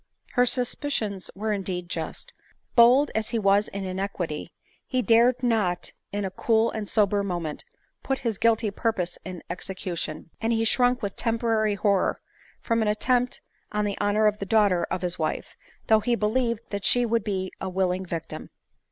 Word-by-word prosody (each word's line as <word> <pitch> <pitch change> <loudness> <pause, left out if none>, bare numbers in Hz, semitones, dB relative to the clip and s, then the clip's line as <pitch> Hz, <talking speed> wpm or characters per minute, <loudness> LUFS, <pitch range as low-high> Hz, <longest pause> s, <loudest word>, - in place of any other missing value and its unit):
Her 250 0 +3
suspicions 240 -6 -1
were 215 +2 -1
indeed 185 -3 -3
just. 165 -2 -5 0.4
Bold 250 +4 +6
as 220 0 0
he 235 - -1
was 200 0 +3
in 200 0 -5
iniquity, 185 -4 -4 0.4
he 255 -1 0
dared 235 +3 +4
not 215 -8 0 0.2
in 205 0 -2
a 190 - -3
cool 225 +3 +2
rind 215 -2 -4
sober 205 -2 +2
moment 175 - -3 0.4
put 270 - -1
his 225 -4 -1
guilty 225 -2 +2
purpose 195 -5 -2
in 185 -2 -7
execution; 175 -3 -4
and 225 +1 +1
he 225 0 +1
shrunk 245 +1 +2
with 200 -1 -3
temporary 225 -2 +1
horror 200 -2 +1 0.4
from 230 -1 +1
an 220 - +1
attempt 245 +4 +1 0.3
on 210 0 0
the 200 -1 -1
honor 205 +1 +2
of 210 0 +2
the 200 - -3
daughter 205 -4 +3
of 185 - -4
his 180 -1 -1
wife, 155 -1 -3 0.3
though 220 -1 +5
he 240 +2 +1
believed 230 +1 -1
that 200 -1 -3
she 245 +4 +4
would 230 -1 +1
be 190 -3 -2
a 190 - -2
willing 185 0 0
victim. 170 -3 -6
210 Hz, 170 wpm, -26 LUFS, 190-230 Hz, 0.4 s, Bold